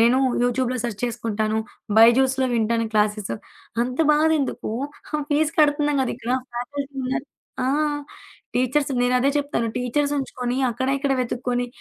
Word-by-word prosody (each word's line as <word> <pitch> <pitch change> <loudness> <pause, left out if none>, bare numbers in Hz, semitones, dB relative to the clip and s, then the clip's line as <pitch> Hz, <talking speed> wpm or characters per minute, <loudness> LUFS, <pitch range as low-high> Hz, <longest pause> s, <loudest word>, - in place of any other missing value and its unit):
నేను 240 +3 +5 0.2
యూట్యూబ్‌లో 250 +1 +1
సెర్చ్ 230 -4 -3
చేసుకుంటాను. 220 -2 -1 0.4
బైజూస్‌లో 260 +3 +5
వింటాను 230 0 +1
క్లాసెస్. 210 - +1 0.5
అంత 250 +3 -4
బాధెందుకు, 305 -6 +1 0.4
ఆ 300 - +2
ఫీస్ 300 +1 +2
కడుతుందాం 290 -1 +3
కద 260 - -1
ఇక్కడ. 240 0 -5 0.2
ఫ్యాకల్టీ 280 +3 -4
ఉన్నారు 265 +2 -2 0.4
ఆ! - - +1 0.9
టీచర్స్. 260 +3 +1
నేనదే 250 +2 +3
చెప్తాను. 285 -5 0
టీచర్స్ 280 +4 0
ఉంచుకొని 250 -2 -2
అక్కడ 260 +3 -2
ఇక్కడ 275 -1 0
వెతుక్కొని, 245 0 -1
250 Hz, 125 wpm, -23 LUFS, 235-280 Hz, 0.9 s, నేను